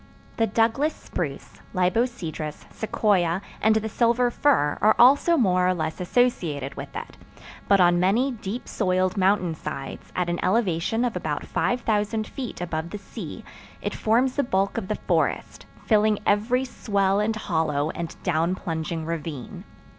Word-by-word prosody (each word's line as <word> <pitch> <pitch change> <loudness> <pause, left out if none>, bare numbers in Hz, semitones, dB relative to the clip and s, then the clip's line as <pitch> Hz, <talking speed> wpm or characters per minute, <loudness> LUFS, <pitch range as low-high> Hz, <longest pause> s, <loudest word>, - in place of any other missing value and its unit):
The 225 - +2
Douglas 230 +8 +1
spruce, 145 -5 -6
libocedrus, 180 -5 -1
sequoia, 190 -6 +1 0.2
and 220 0 +4
the 220 0 0
silver 240 +2 +2
fir 235 - +2
are 215 - +5
also 285 +7 +6
more 185 -7 +3
or 185 - +2
less 160 0 -3
associated 175 - 0
with - - -8
it; - - -7 0.5
but 200 - +5
on 175 -1 +5
many 220 +9 +2
deep 225 0 -6
soiled 185 +1 0
mountain 185 -3 +2
sides, 135 -3 -7
at 180 -1 0
an 175 0 -1
elevation 200 +2 +1
of 240 - -2
about 155 -4 -3
5000 220 -2 0
feet 250 -4 -6
above 165 -1 -3
the 210 - -5
sea, 200 - -8 0.3
it - - -3
forms 250 +5 +1
the 285 - +3
bulk 195 -3 0
of 195 - -7
the 215 - -1
forest, - - -1 0.2
filling 215 -1 +3
every 240 +6 +2
swell 200 -5 0
and 215 +1 0
hollow 160 -7 -1
and 170 -1 -6
down 170 0 +1
plunging 160 -2 -4
ravine. 160 -5 -5
195 Hz, 150 wpm, -25 LUFS, 170-225 Hz, 0.5 s, also